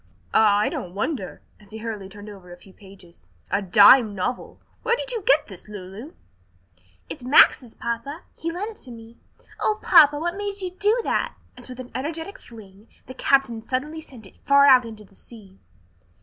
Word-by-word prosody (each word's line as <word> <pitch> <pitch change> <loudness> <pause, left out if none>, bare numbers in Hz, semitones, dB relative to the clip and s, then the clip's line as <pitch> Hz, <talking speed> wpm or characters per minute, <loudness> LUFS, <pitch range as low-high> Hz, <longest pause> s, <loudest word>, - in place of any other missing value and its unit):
"Ah, 210 -2 +4
I 210 - +1
don't 180 +1 -7
wonder!" 205 - -4 0.2
as 205 -2 -20
he 220 - -9
hurriedly 215 -4 -7
turned 205 +1 -12
over 195 -4 -12
a 175 - -11
few 190 +1 -19
pages. 190 - -17 0.2
"A 200 - +1
dime 205 +3 +6
novel! 220 +7 -4 0.2
Where 470 0 +1
did - - -5
you 465 -3 -3
get 295 -4 +3
this, 190 -2 -13
Lulu?" 205 - -10 0.9
"It's - - -9
Max's, 250 -2 +4
papa, 235 +8 -5
he 335 - -4
lent 400 +6 -5
it 430 - -16
to - - -13
me. 230 0 -13 0.4
O 425 - 0
papa, 295 -4 +6
what 345 +3 -3
made 405 0 -5
you 370 -2 -4
do 415 +5 +1
that?" - - -2 0.2
as 250 0 -11
with 250 0 -10
an 250 -1 -9
energetic 320 +7 -5
fling 210 -2 -16 0.2
the 260 - -10
captain 260 -3 +1
suddenly 300 +5 -3
sent 245 -8 -14
it - - -19
far 280 0 +5
out 255 -3 +6
into 220 -2 -10
the 200 - -23
sea. 195 -2 -16
235 Hz, 190 wpm, -23 LUFS, 205-305 Hz, 0.9 s, dime